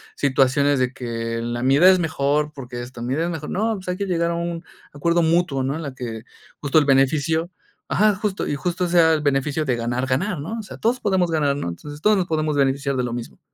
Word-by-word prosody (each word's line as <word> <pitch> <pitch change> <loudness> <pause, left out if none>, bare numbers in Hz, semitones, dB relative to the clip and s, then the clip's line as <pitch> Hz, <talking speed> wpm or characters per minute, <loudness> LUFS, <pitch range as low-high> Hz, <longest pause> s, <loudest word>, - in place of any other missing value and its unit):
situaciones 140 +1 +2
de 130 0 0
que 115 -2 -4
la 120 +1 -3
mi 135 +1 +4
idea 175 +6 +7
es 190 - +6
mejor 150 -2 0
porque 125 -4 -7
esto, 120 -1 -10
la 120 - -4
mi 130 - -1
idea 165 +3 0
es 175 - -2
mejor. 155 -2 -5
No, 220 +4 0
pues, 190 -3 -8
hay 180 - -2
que 200 - -2
llegar 170 -3 0
a 170 - -1
un 170 0 -3 0.3
acuerdo 170 +4 +1
mutuo, 160 -5 +1
¿no? 135 +2 -1
En 160 - -5
la 140 -4 -6
que 115 -3 -6 0.4
justo 145 +1 +1
el 155 - +5
beneficio, 150 +5 +2 0.4
ajá, 210 0 +3
justo 205 -1 -2
y - - -1
justo 180 +4 -1
sea 170 -2 +5
el 155 - 0
beneficio 145 +1 0
de 130 -3 +1
ganar-ganar, 130 - -1
¿no? 190 +11 -5
O - - -5
sea, - - -10
todos 240 +3 0
podemos 185 -5 +1
ganar, 145 -3 +1
¿no? 140 - -3
Entonces, 145 - -9
todos 210 +3 +4
nos 180 -2 0
podemos 155 -2 0
beneficiar 140 0 +1
de 125 - 0
lo 120 -1 -3
mismo. 120 -1 -7
150 Hz, 245 wpm, -22 LUFS, 130-170 Hz, 0.4 s, idea